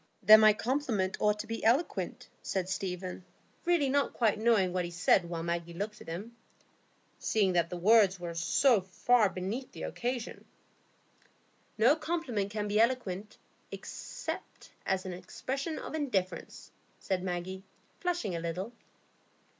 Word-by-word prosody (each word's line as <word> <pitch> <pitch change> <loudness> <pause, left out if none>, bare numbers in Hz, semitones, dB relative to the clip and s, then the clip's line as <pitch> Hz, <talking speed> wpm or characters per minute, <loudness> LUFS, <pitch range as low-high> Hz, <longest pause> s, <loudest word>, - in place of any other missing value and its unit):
"Then 215 0 +10
my 215 0 +8
compliment 225 -5 -1
ought 210 0 +2
to - - -9
be 225 +1 -5
eloquent," 250 +10 +1
said 185 -2 -2
Stephen, 185 -1 -4 0.4
really 340 -5 +3
not 280 +1 +1
quite 220 -3 +1
knowing 215 -5 +3
what 180 -1 0
he 175 - -4
said 175 0 +2
while 165 -1 -3
Maggie 170 0 -3
looked 210 +3 -5
at - - -12
him, 200 +8 -6 0.8
"seeing 200 -4 +2
that 170 -1 +2
the 180 - -4
words 195 0 +5
were 170 -1 -5
so 200 +7 +3
far 210 +4 +3
beneath 195 +9 -4
the - - -7
occasion." 245 -1 -4 1.3
"No 240 +7 +5
compliment 305 - -2
can 210 0 -3
be 205 +1 +1
eloquent, 215 -5 0 0.3
except - - -7 0.2
as 190 0 0
an 185 - -4
expression 275 - -4
of - - -7
indifference," 195 - -3 0.3
said 190 -2 -1
Maggie, 185 +1 -4 0.4
flushing 350 - -1
a - - -2
little. 180 +7 -4
205 Hz, 145 wpm, -31 LUFS, 180-240 Hz, 1.3 s, Then